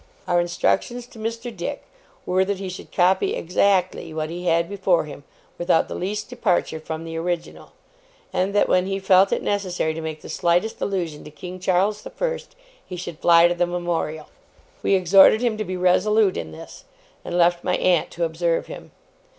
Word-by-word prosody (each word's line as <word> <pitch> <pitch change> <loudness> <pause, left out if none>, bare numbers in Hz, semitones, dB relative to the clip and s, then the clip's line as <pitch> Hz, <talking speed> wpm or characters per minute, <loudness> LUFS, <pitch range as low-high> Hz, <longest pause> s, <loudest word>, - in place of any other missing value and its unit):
Our 175 -1 +3
instructions 235 +7 -1
to 240 -2 -15
Mr. 230 +1 -5
Dick 195 +11 -5 0.4
were 185 +1 +2
that 200 0 -2
he 190 -1 -5
should 185 - -9
copy 185 +1 +2
exactly 180 -2 0
what 155 0 -3
he 175 +1 -5
had 170 0 +2
before 190 -3 +1
him, 145 -1 -10 0.4
without 175 -1 +2
the - - -6
least 210 +3 -3
departure 190 -9 0
from 160 +1 -6
the 165 0 -7
original; 170 0 -4 0.6
and 190 +2 0
that 205 - +4
when 185 0 +2
he 195 0 -1
felt 190 0 +4
it - - 0
necessary 185 -5 -1
to 160 - -6
make 155 -1 -6
the - - -9
slightest 175 +6 0
allusion 175 -6 -3
to - - -9
King 180 +5 -9
Charles 190 +3 +1
the - - -9
First, - - -4 0.3
he 180 - -8
should 175 -2 -7
fly 170 0 +6
to 175 - 0
the 175 0 0
Memorial. 170 -3 -3 0.6
We 195 - +3
exhorted 195 +4 +6
him 240 -3 +1
to - - 0
be 185 -2 -4
resolute 190 +3 +3
in 80 - -5
this, 80 - -11 0.4
and 175 - -3
left 175 0 +3
my 180 - +1
aunt 175 -3 +2
to 170 - -3
observe 165 +1 0
him. - - -10
180 Hz, 190 wpm, -23 LUFS, 170-195 Hz, 0.6 s, fly